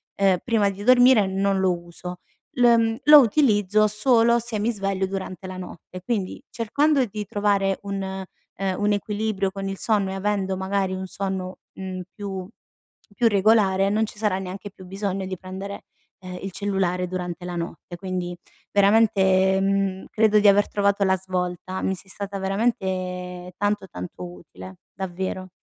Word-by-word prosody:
ehm, 195 -2 +3
prima 220 -4 +2
di 195 +1 -7
dormire 245 -4 +6
n 190 - -4
non 195 -1 +2
lo 185 -2 +2
uso. 175 +1 -9 0.4
L - - +4
ehm, 230 -1 +4
lo 300 0 +10
utilizzo 215 -5 +3
solo 235 +2 +3
se 235 -1 -3
mi 220 +3 +1
sveglio 195 -3 -1
durante 190 -1 -6
la 185 0 -7
notte. 180 0 -9
Quindi 200 -3 -2
,cercando 280 +5 +2
di 210 -1 -6
trovare 200 -1 +1
un, 200 -1 -3
ehm, 190 0 -5
un 210 0 +2
equilibrio 205 -1 -1
con 195 0 -5
il 195 - -4
sonno 205 -3 +1
e - - -4
avendo 195 -1 -1
magari 190 0 -1
un 190 0 -4
sonno, 190 -1 -4 0.2
mhmm, 185 -1 -6
più 195 -3 -5 0.7
più 230 +1 +3
regolare 195 -2 +3
non 215 +2 +2
ci 210 - -11
sarà 210 -3 +1
neanche 190 +1 -6
più 185 -1 -14
bisogno 195 0 -3
di 185 0 -5
prendere, 190 +2 -7 0.3
ehm, 180 -1 -8
il 195 - -5
cellulare 185 -2 -1
durante 180 -1 -5
la 180 0 -5
notte. 170 0 -6
Quindi, 180 -1 -4 0.3
veramente, 195 -2 +4
mhmm, 195 -1 0
credo 215 -1 +4
di 205 - +5
aver 200 +1 +4
trovato 200 -1 +1
la 190 0 +3
svolta. 185 0 -3
Mi 190 - 0
sei 190 +1 -15
stata 200 0 -5
veramente 185 -3 -2
tanto 205 -1 -1
tanto 90 - -8
utile, 95 +1 -12 0.2
davvero. 185 0 -4
195 Hz, 165 wpm, -24 LUFS, 185-210 Hz, 0.7 s, lo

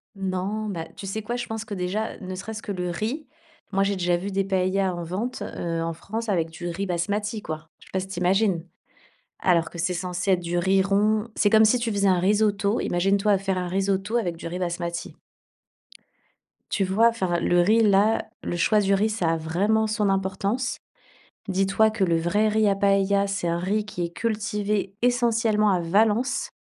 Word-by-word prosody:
Non, 195 +3 -2
bah, 165 -4 -4
tu 195 - -8
sais 215 +3 -3
quoi? 235 +3 -4
Je 245 - -3
pense 225 0 -5
que 210 - -7
déjà, 195 +4 -2
ne 185 -1 -6
serait-ce 220 +3 -7
que 205 - -4
le 180 -2 -3
riz, 225 - -3 0.4
moi, 195 0 +2
j'ai 200 0 0
déjà 175 -1 +1
vu 195 +3 -5
des 195 0 +1
paëllas 190 0 0
en 175 - -5
vente, 200 +9 -4
heu, 165 -1 -3
en 165 0 -2
France, 220 +6 -5
avec 165 -4 +1
du 175 +2 -7
riz 190 +3 -3
basmati, 205 +5 -2
quoi. 155 -1 -7
Je - - -18
sais - - -18
pas 190 - +1
si 190 - -5
tu 190 -2 -5
imagines? 185 -1 +2 0.7
Alors 170 -3 +2
que 170 - -10
c'est 175 +2 0
censé 180 +2 -1
être 180 - +2
du 175 0 -2
riz 190 +2 +3
rond. 210 +3 +1
C'est 205 - +3
comme 220 0 +6
si 245 +3 +4
tu 235 -2 -2
faisais 200 -1 +2
un 185 -1 +4
risotto, 205 +2 +2
imagine-toi 195 +3 +2
faire 190 -1 -1
un 180 -1 -2
risotto 195 +3 0
avec 175 -8 -1
du 165 - -9
riz 180 +2 -5
basmati. 170 -1 -3 1.6
Tu 195 - +1
vois? 215 +5 +4
Enfin, 185 -7 -1
le 175 0 +3
riz-là 215 +1 +3
le - - -3
choix 210 +5 +3
du 200 -1 +2
riz, 210 +3 +2
ça 180 -7 0
a 165 - +1
vraiment 200 +8 +1
son 215 -1 0
importance. 195 +6 -1 0.7
Dis-toi 195 +3 +2
que 205 -3 -1
le 170 -2 +2
vrai 205 +6 +1
riz 215 0 +2
à 200 - +3
paëlla, 200 0 +2
c'est 195 -3 -2
un 170 0 0
riz 205 +4 -1
qui 205 -5 -4
est 170 - -2
cultivé 210 -1 -2
essentiellement 230 -4 +2
à 185 -2 +2
Valence 215 +8 +1
195 Hz, 200 wpm, -25 LUFS, 180-215 Hz, 1.6 s, comme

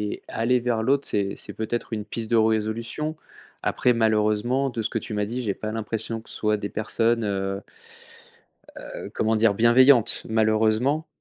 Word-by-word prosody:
et - - -18
aller 125 +2 +1
vers 120 -2 -1
l'autre 140 +4 +2
c'est 100 -1 -1
c'est - - -8
peut-être 115 +1 -4
une 105 -2 -3
piste 110 +1 -5
de 115 - +4
résolution. 110 +7 0 0.5
Après, 125 - +2
malheureusement, 110 +4 +1
de 115 - -3
ce 110 - -1
que - - -2
tu 110 - -7
m'as 105 0 0
dit, 120 +4 -4
j'ai 105 -4 -1
pas 110 +2 -5
l'impression 115 +1 -4
que - - -12
ce - - -5
soit 105 0 +1
des 100 -1 -5
personnes, 115 +2 0
heu 95 -1 -2 1.4
heu, - - -7
comment 110 0 +1
dire, 110 -1 +4
bienveillantes, 120 +2 +5
malheureusement. 110 +7 +2
110 Hz, 175 wpm, -24 LUFS, 110-120 Hz, 1.4 s, bienveillantes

